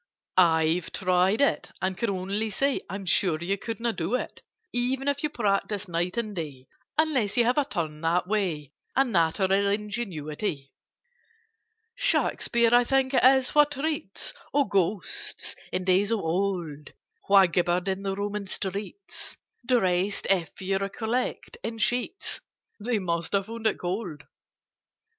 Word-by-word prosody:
"I've 165 -1 +3
tried 185 +4 +2
it, 280 - +2
and 185 +1 -1
can 235 +3 -1
only 200 +3 -1
say 275 +7 +1
I'm 195 +1 -5
sure 175 -2 +3
you 175 +5 -1
couldn't 230 +3 -3
do 175 +8 0
it, - - -4 0.3
e 245 +2 +1
ven 270 +1 -7
if 285 0 +1
you 300 - 0
practised 205 -4 -1
night 175 +4 -1
and 215 -3 -2
day, 145 -7 -5 0.3
Unless 275 -10 +2
you 240 - +6
have 245 +5 +2
a 285 - +1
turn 160 - -3
that 170 +2 +1
way, 180 -8 -2 0.2
And 270 -2 +3
natural 175 +2 +2 0.2
ingenuity. 195 - -3 1.2
"Shakspeare 240 - +2
I 245 0 +7
think 270 +1 +1
it - - +3
is 260 0 +6
who 295 - +7
treats 295 -6 -2 0.2
Of 285 -2 +2
Ghosts, 195 0 -1 0.2
in 185 - -1
days 190 +2 +3
of 225 -3 +1
old, 165 -4 -2 0.3
Who 200 - +4
'gibbered 175 +1 +1
in 190 0 -1
the 195 -1 -2
Roman 205 0 -3
streets,' 200 - -3 0.3
Dressed, 195 -5 +1
if 180 -3 0
you 195 +1 0
recollect, 225 - -3
in 225 - -4
sheets— 245 - -1 0.4
They 230 +2 0
must 170 -3 -2
have 195 -1 +2
found 225 +1 -2
it - - +1
cold. 175 -5 -4
200 Hz, 150 wpm, -27 LUFS, 180-235 Hz, 1.2 s, I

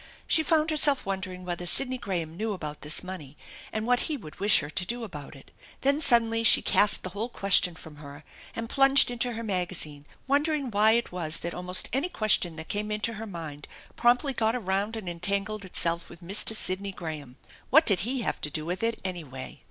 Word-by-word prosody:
She 320 - +5
found 315 0 +1
herself 290 -2 +2
wondering 185 -2 -5
whether 175 0 -4
Sidney 255 +6 +4
Graham 170 -7 -4
knew 215 +3 -2
about 150 -5 -7
this 150 +4 +2
money 165 -7 -8 0.3
and 215 0 -3
what 245 0 +2
he 305 - -2
would 155 - -12
wish 205 +1 +5
her 145 - -7
to 180 - -1
do 240 +6 -4
about 150 -8 -8
it. 135 - -16 0.3
Then 280 +3 +2
suddenly 230 -4 +3
she 230 - +7
cast 205 - +3
the 185 - -5
whole 215 +5 -4
question 195 -5 +3
from 160 -3 -12
her 145 0 -11 0.3
and 230 0 -4
plunged 270 0 +4
into 245 0 -1
her 230 +1 -5
magazine, 180 -7 -3 0.2
wondering 285 -1 0
why 215 +2 +5
it 235 +1 0
was 165 -3 -2
that 170 - -4
almost 180 +1 0
any 275 +7 0
question 210 - +1
that 160 0 -8
came 210 +1 -3
into 210 +2 -1
her 220 +1 -7
mind 160 -6 -8 0.3
promptly 245 +4 +2
got 225 -1 +1
around 200 0 -1
and 215 -4 -7
entangled 200 +5 -2
itself 170 -2 -2
with 170 0 -14
Mr. 200 +5 +2
Sidney 195 -1 -1
Graham. 155 -8 -8 0.3
What 315 +5 +6
did 200 -5 +3
he 245 +7 -2
have - - -3
to 150 - -2
do 155 +1 -5
with 180 +2 -4
it, 230 0 -1
anyway? 155 -8 -7
195 Hz, 205 wpm, -27 LUFS, 170-230 Hz, 0.3 s, she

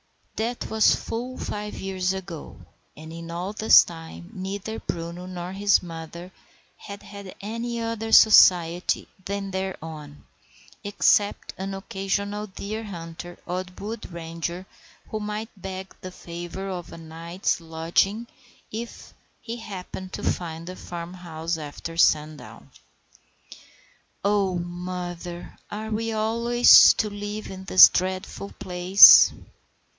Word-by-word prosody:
That 235 +2 -3
was 220 -1 +4
full 250 +3 -5
five 210 0 -5
years 190 -1 -2
ago, 180 -4 -8 0.4
and 160 +1 -10
in 165 0 -8
all 175 +4 -4
this 215 +1 +7
time 165 +2 -11
neither 200 +3 -5
Bruno 170 +1 -6
nor 180 -1 -6
his 200 +1 +2
mother 170 +1 -9 0.4
had 200 0 -10
had 200 -2 -10
any 230 +3 -4
other 225 -1 -4
society 180 -6 +5 0.2
than 200 0 -4
their 190 0 -3
own, 150 -3 -10 0.6
except 205 +1 +1
an 195 +1 -4
occasional 200 +1 -3
deer 210 +3 -6
hunter 175 -2 -8
or 180 +1 -3
wood 215 -1 -7
ranger 170 +2 -5 0.4
who 215 - -3
might 210 +1 -5
beg 190 0 -8
the 185 - -7
favour 175 +2 -7
of 180 -3 -6
a - - -9
night's 165 +3 -3
lodging 165 +7 0 0.5
if 230 +2 -8 0.3
he 235 0 -7
happened 190 -3 -8
to - - -6
find 165 -2 -3
the 185 +1 -7
farm 175 0 -8
house 165 -2 -5
after 155 +2 -7
sundown. 155 -2 0 1.5
"Oh, 200 -2 +2
mother, 175 0 -6
are 215 +1 -6
we 225 +1 -2
always 235 +2 +6
to 215 - 0
live 205 +1 -6
in 190 0 -9
this 185 - +10
dreadful 185 +2 -3
place?" 180 +1 +8
185 Hz, 125 wpm, -24 LUFS, 170-210 Hz, 1.5 s, this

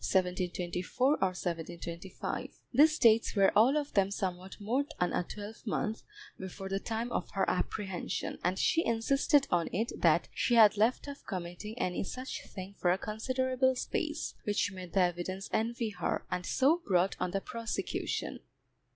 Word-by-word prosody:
These 190 -1 +3
dates 180 0 -4 2.4
were 195 -1 +5
all 245 +8 +6
of 290 -1 -2
them 195 -1 +3
somewhat 190 -2 -4
more 235 +7 +1 0.2
than 180 - +1
a - - +1
twelvemonth 215 +3 -4 0.4
before 190 +1 -6
the 195 0 0
time 230 +3 -3
of 180 - -2
her 195 -1 +1
apprehension, 190 0 -2
and 180 +2 +1
she 330 - +3
insisted 275 +5 +3
on 170 -1 +2
it 225 +5 -1
that - - +4
she 240 - +1
had 215 -3 +8
left 225 +7 +2
off 285 0 -8
committing 185 +4 -5
any 180 -5 -1
such 255 +7 -5
thing 190 0 -8
for 175 - +2
a 180 - +2
considerable 255 +5 0
space, 305 +4 -2
which 205 -1 0
made 185 -2 -9
the 195 - +4
evidence 180 +2 -1
envy 230 0 0
her, - - -2
and 180 0 -2
so 310 +7 +3
brought 185 0 +3
on 180 - 0
the 195 +2 -1
prosecution. 230 +3 -3
205 Hz, 150 wpm, -31 LUFS, 185-240 Hz, 2.4 s, had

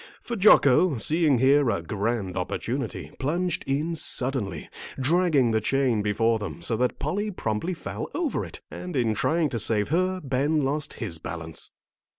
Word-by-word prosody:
For 235 - -5
Jocko, 180 - +5
seeing 150 +4 +3
here 135 +1 +4
a 100 -6 -1
grand 100 +1 -2
opportunity, 115 +7 -3
plunged 170 +5 -1
in 150 +5 0
suddenly, 125 - -3 0.3
dragging 150 -3 +3
the 110 0 +1
chain 130 -2 +1
before 110 +2 +1
them 105 -4 -6
so 115 - 0
that 125 +1 0
Polly 205 +8 -2
promptly 165 - -2
fell - - -6
over 345 -4 -1
it. - - -9
And 180 -2 -6
in 120 -4 +2
trying 160 +7 +1
to 120 - -3
save 105 -1 +1
her, 185 +4 +1
Ben 140 +3 +1
lost 145 +2 -2
his 90 -9 -5
balance. 80 -2 -7
135 Hz, 160 wpm, -26 LUFS, 110-160 Hz, 0.3 s, Jocko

